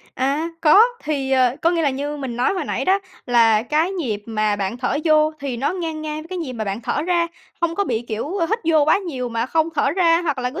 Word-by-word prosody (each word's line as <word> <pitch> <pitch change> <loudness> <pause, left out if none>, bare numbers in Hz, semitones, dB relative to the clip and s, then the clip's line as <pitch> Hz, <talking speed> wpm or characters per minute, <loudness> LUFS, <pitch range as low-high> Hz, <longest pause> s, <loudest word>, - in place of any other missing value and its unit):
À, 280 +5 0
có. 325 +5 +6 0.2
Thì, 280 -3 -2
ờ, 255 -1 +3
có 335 - +4
nghĩa 340 -1 0
là 290 - +2
như 285 +3 -4
mình 265 -5 -5
nói 245 - +1
hồi 370 - -2
nãy - - -2
đó, 380 +1 +3 0.3
là 230 -3 +4
cái 305 +8 +1
nhịp 240 - -3
mà 215 -2 0
bạn 200 +2 -3
thở 250 +2 -1
vô 310 -1 +4
thì 275 -3 -3
nó 270 +7 -1
ngang 325 -4 -4
ngang 305 0 -4
với 320 - -14
cái 370 0 -4
nhịp 310 -7 -4
mà 225 -3 -4
bạn 200 +2 -3
thở 290 - -1
ra, 345 0 +1 0.3
không 335 -1 0
có 405 +3 0
bị, 235 -5 -1
kiểu, 235 - -4
ờ, 335 - +1
hít 445 - +1
vô 315 -3 +4
quá 315 - +4
nhiều 270 -11 -4
mà 230 0 -2
không 320 +3 +1
thở 285 - +2
ra, 335 0 +3
hoặc 295 -5 -1
là 250 0 -1
cứ - - -6
290 Hz, 265 wpm, -21 LUFS, 245-330 Hz, 0.3 s, có